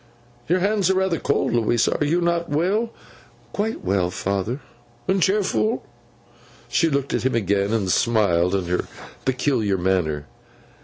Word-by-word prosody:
'Your 180 +2 +2
hands 200 -1 +2
are 190 - +3
rather 190 -3 +1
cold, 140 - 0
Louisa. 120 0 +2
Are - - +2
you 170 +4 +1
not 170 0 0
well?' 190 +10 +1 0.6
'Quite 215 +2 -2
well, 95 -1 +1
father.' 100 +7 -2 0.5
'And 190 0 +2
cheerful?' 210 +4 +1 0.8
She 165 - +2
looked 140 -2 -1
at - - +1
him 130 -1 +1
again, 100 -2 +1
and 110 -4 0
smiled 100 -7 +2
in 95 -2 -1
her 90 +1 -1 0.4
peculiar 125 -6 +1
manner. 85 -5 0
125 Hz, 145 wpm, -23 LUFS, -, 0.8 s, are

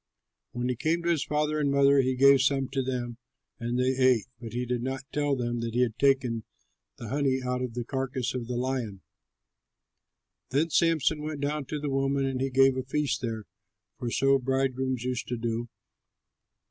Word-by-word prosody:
When 120 0 -2
he 125 - 0
came 165 +7 0
to 170 - 0
his 160 -4 +1
father 150 0 0
and 145 -2 +1
mother, 140 0 +5
he 130 0 0
gave 140 +1 +6
some 135 -1 +1
to 135 0 -1
them, 125 -2 -3 0.4
and 120 +1 -2
they 130 +1 +2
ate; 130 -4 +3
but 115 -1 -7
he 125 +2 -2
did 125 -1 -2
not 130 +1 -3
tell 145 -1 +1
them 120 -1 -2
that 115 0 -4
he 125 - +3
had 115 -2 -3
taken 130 -5 +2 0.5
the 115 - -7
honey 135 -1 +1
out 125 0 -1
of 125 -2 -4
the 120 - -2
carcass 130 0 -2
of 125 -3 -4
the 125 0 -3
lion. 120 -6 -2 1.5
Then 155 +5 +1
Samson 160 -1 +2
went 150 -1 -4
down 145 0 -1
to 150 +3 -4
the 145 -1 -3
woman; 135 0 +1
and 130 -1 -2
he 135 - 0
gave 135 0 +4
a 130 - -1
feast 145 +2 -1
there 115 -3 -3 0.6
(for 120 - -2
so 135 +3 +3
bridegrooms 130 -1 -1
used 125 -1 -2
to 120 - -2
do). 115 +1 -3
130 Hz, 195 wpm, -28 LUFS, 120-140 Hz, 1.5 s, gave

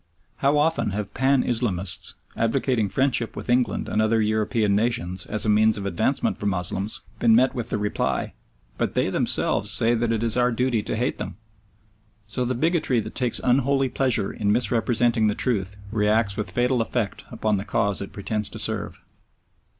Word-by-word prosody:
How 140 +2 +2
often 160 -3 +1
have 105 -2 -4
Pan 135 0 +2
Islamists, 100 -7 0 0.2
advocating 115 -2 0
friendship 130 -3 0
with - - -4
England 125 -1 +1
and 110 - 0
other 110 +1 +2
European 110 -1 +1
nations 105 -5 -1
as 110 - -1
a - - -1
means 110 +1 +4
of 100 - -5
advancement 95 -4 0
for 105 - -2
Moslems, 95 +2 -3 0.2
been 115 -2 +5
met 130 +2 +4
with 120 -3 -4
the - - -1
reply, 105 0 -1 0.5
"But - - -1
they - - +1
themselves 105 - 0
say 115 +2 +1
that 115 0 0
it 115 0 0
is 115 -2 +4
our 125 0 +2
duty 120 -1 0
to - - -3
hate 125 +5 -1
them"! - - -6 0.9
So 110 +4 -2
the 125 +1 -1
bigotry 155 -3 +1
that 110 0 -6
takes 125 -3 -1
unholy 135 +1 +2
pleasure 130 -7 +1
in 105 -1 0
misrepresenting 115 0 +2
the 105 - 0
truth 105 -5 -1
reacts 105 -1 +1
with 105 -1 -3
fatal 125 0 +1
effect 115 -2 -2
upon 105 -2 -1
the 95 - -3
cause 100 -1 -1
it 100 - -6
pretends 105 +1 -2
to - - -8
serve. - - -1
115 Hz, 180 wpm, -24 LUFS, 105-125 Hz, 0.9 s, been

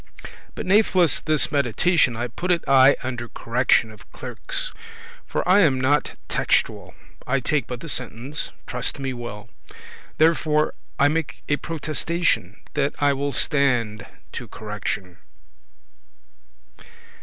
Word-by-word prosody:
*opinion - - -14
But - - -5
natheless 185 -4 +4
this 155 -1 +2
meditation 140 - +2
I 120 - -1
put 175 +10 -5
it 175 -2 +2
aye 135 0 +7
under 120 -2 -4
correction 115 -1 +1
Of 105 -1 -17
clerkes,* - - -3 0.5
for - - -2
I 185 +3 +6
am 145 -9 +4
not 140 +3 +1
textuel; - - 0
*scholars - - -24
I 135 +2 +2
take 135 -1 -1
but 125 -1 -6
the - - -7
sentence,* 130 0 -3
trust 125 +2 -3
me 135 -2 -3
well. 120 -4 -7
*meaning, - - -33
sense - - -17
Therefore 155 -1 +3 0.2
I 140 - +5
make 160 +1 -2
a 145 - +2
protestation, 155 - -1 0.2
That 145 -1 0
I 145 -1 +3
will 140 +1 -2
stande 125 -6 +1 0.2
to - - -6
correction." 100 -4 -5
135 Hz, 140 wpm, -23 LUFS, 120-155 Hz, 0.5 s, aye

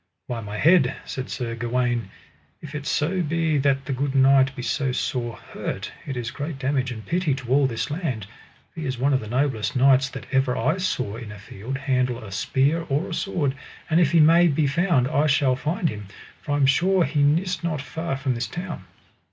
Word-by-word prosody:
By 120 -2 -3
my 105 0 -6
head, 155 -2 +4
said 130 0 -5
Sir 120 -3 -3
Gawaine, 120 0 -1 0.5
if 150 -1 -10
it 150 -1 -5
so 170 +4 0
be 160 -2 +1
that 135 -1 +1
the 135 - -2
good 135 +1 -2
knight 135 0 +5
be 125 - -6
so 135 +2 0
sore 120 -2 -2
hurt, - - -6 0.2
it 135 -3 -4
is 120 -1 -3
great 145 0 -5
damage 130 -1 -1
and 110 -2 -7
pity 170 -5 0
to 130 -3 -8
all 140 0 +4
this 115 +3 -3
land, 145 - -3 0.5
for - - -9
he 155 - -3
is 130 -1 -2
one 140 +3 +2
of 130 - +3
the 110 - -8
noblest 130 0 0
knights 135 +1 +4
that - - -8
ever 135 -2 +2
I 150 +10 +1
saw 125 - -2
in 115 -3 -8
a 105 - -9
field 105 +6 -6
handle 130 -3 0
a 100 - -9
spear 135 - +1
or 145 +6 0
a - - -4
sword; 165 -7 -1 0.4
and 160 - +5
if 160 -5 +3
he 170 - +5
may 165 +3 +6
be 150 -1 +2
found 145 -2 +2
I 145 +3 +2
shall 135 -3 +3
find 165 +6 -1
him, 105 -7 -5 0.3
for 145 - -3
I - - +2
am 140 - +4
sure 180 +7 +3
he 145 0 0
nis 170 +6 +1
not 160 -3 -1
far 160 +1 -4
from 135 -1 -1
this 120 +1 -3
town. 175 -1 -6
135 Hz, 215 wpm, -24 LUFS, 125-155 Hz, 0.5 s, may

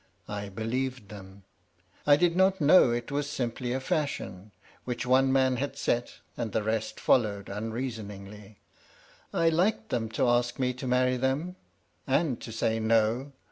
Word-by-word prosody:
I 105 -1 -5
believed 120 +2 -3
them. 100 -2 -11 0.6
I 145 - +8
did 170 +2 +2
not 190 +1 +3
know 150 -1 +6
it 120 +1 -2
was 145 0 -1
simply 120 -2 -3
a 130 - 0
fashion, 110 -9 -3 0.3
which 125 -1 -3
one 130 +1 +4
man 130 -1 +3
had 140 +1 -3
set 120 -3 -1
and 115 -4 -4
the 110 - 0
rest 110 0 -2
followed 100 -5 +1
unreasoningly. 105 -2 -6 0.7
I 165 - +3
liked 195 +7 +1
them 115 -2 -1
to 125 - +1
ask 120 0 +1
me 125 -1 0
to 130 +1 -6
marry 125 0 +2
them, 135 +8 -1 0.5
and 135 -2 +1
to 115 - -7
say, 115 0 0
No. 115 +5 +1
125 Hz, 155 wpm, -28 LUFS, 110-135 Hz, 0.7 s, I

